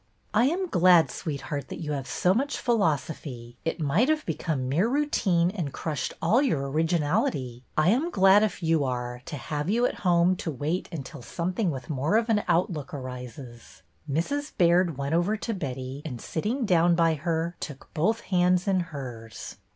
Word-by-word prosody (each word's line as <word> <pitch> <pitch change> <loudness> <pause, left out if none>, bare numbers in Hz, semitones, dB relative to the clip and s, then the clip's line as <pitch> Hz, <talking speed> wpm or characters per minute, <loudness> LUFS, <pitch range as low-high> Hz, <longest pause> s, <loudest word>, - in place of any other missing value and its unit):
I 220 +3 +4
am 360 +6 0
glad, 180 - +5
sweetheart, 145 -3 -4
that - - -7
you 155 -3 -4
have 140 -2 -3
so 180 +8 +2
much 275 +7 -1
philosophy. 145 - -1
It 165 +1 -2
might 165 - +2
have 310 -1 +1
become 155 -5 -2
mere 160 - +2
routine 200 - +2
and 175 -9 -3
crushed 155 0 -3
all 220 +11 +4
your 150 - 0
originality. 150 -6 0
I 155 +3 +4
am 270 - +2
glad, 195 - +6
if 205 -4 -1
you 160 -2 +2
are, 125 -1 -3
to 150 - -5
have 150 +5 -3
you 235 +4 +3
at - - -2
home 175 0 +3
to 170 - -4
wait 155 +5 -2
until 150 -3 -7
some 170 +8 -3
thing 195 -1 0
with 130 -5 -5
more 150 +9 +1
of 230 +1 0
an 210 -2 +3
outlook 165 -5 0
arises." 125 -2 -9 0.3
Mrs. 285 - -1
Baird 175 -3 +3
went 140 +2 -2
over 175 +6 +2
to 225 +2 -3
Betty 135 -5 -5
and, 125 -7 -6
sitting 225 - -2
down 175 -3 +4
by 165 -1 +3
her, 165 +2 -2
took 145 -5 -8
both 215 +9 +1
hands 180 0 +2
in 190 -1 +3
hers. 130 -10 -7
165 Hz, 180 wpm, -27 LUFS, 140-190 Hz, 0.3 s, glad